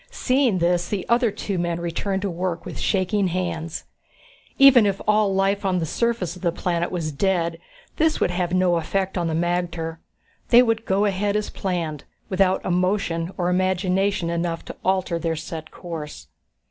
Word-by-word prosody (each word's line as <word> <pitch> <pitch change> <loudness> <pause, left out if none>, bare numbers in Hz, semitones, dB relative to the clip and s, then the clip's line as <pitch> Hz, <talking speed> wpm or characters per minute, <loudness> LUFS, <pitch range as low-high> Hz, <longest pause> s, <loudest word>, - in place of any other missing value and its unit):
Seeing 255 -6 +1
this, 175 0 +1
the 200 -3 -3
other 235 0 +4
two 195 -2 -3
men 170 -1 -1
returned 190 +3 -2
to 200 - 0
work 175 0 -3
with - - -7
shaking 195 0 +1
hands. 170 -3 -3 0.7
Even 265 -6 +7
if 195 -1 -1
all 210 -1 +3
life 195 +1 +1
on 190 -2 +1
the 170 - 0
surface 225 -1 -1
of 180 - -13
the 175 -3 +1
planet 175 0 -1
was 165 -4 -2
dead, 170 +1 0 0.4
this 315 0 +2
would - - +1
have 175 -1 -1
no 180 -1 +3
effect 190 +3 -1
on 175 -2 0
the 160 - -1
magter. 170 -1 -2 0.5
They 245 +1 +8
would 225 -1 0
go 195 +2 +2
ahead 200 +1 0
as 210 0 -1
planned, 170 -6 -3 0.2
without 190 0 +2
emotion 180 -2 0
or 175 - 0
imagination 185 0 +1
enough 170 0 -2
to - - -8
alter 185 -3 0
their 165 -1 -1
set 160 0 -7
course. 160 -4 -7
185 Hz, 170 wpm, -23 LUFS, 170-195 Hz, 0.7 s, They